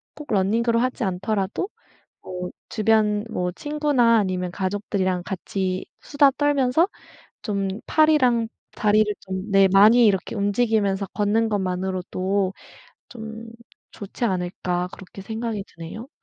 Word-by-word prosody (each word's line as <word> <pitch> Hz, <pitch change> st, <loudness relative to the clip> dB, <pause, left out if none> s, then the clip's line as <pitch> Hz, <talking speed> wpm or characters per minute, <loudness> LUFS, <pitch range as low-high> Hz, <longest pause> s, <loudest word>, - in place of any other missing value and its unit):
꼭 300 Hz, -5 st, -9 dB
running으로 230 Hz, +4 st, +2 dB
하지 255 Hz, +1 st, -1 dB
않더라도 195 Hz, -, -2 dB, 0.5 s
뭐 180 Hz, -1 st, -6 dB, 0.2 s
주변 215 Hz, -1 st, +2 dB
뭐 180 Hz, -4 st, -1 dB
친구나 290 Hz, -, +2 dB
아니면 185 Hz, -3 st, -1 dB
가족들이랑 190 Hz, -1 st, -1 dB
같이 185 Hz, +1 st, -3 dB, 0.2 s
수다 285 Hz, -1 st, +4 dB
떨면서 290 Hz, +2 st, +2 dB, 0.6 s
좀 200 Hz, -3 st, -1 dB, 0.2 s
'팔이랑 260 Hz, -7 st, +3 dB, 0.3 s
다리를 210 Hz, -1 st, +3 dB
좀 190 Hz, +2 st, -5 dB
네 195 Hz, 0 st, +6 dB
많이 220 Hz, +5 st, +7 dB
이렇게 195 Hz, -1 st, +1 dB
움직이면서 205 Hz, -1 st, +1 dB
걷는 215 Hz, +2 st, +1 dB
것만으로도 190 Hz, 0 st, -1 dB, 0.6 s
좀 225 Hz, -1 st, -8 dB, 0.4 s
좋지 210 Hz, +4 st, -6 dB
않을까?' 180 Hz, -2 st, -2 dB
그렇게 190 Hz, 0 st, -11 dB
생각이 220 Hz, -1 st, -4 dB
드네요. 170 Hz, +10 st, -9 dB
205 Hz, 290 characters per minute, -23 LUFS, 190-230 Hz, 0.6 s, 많이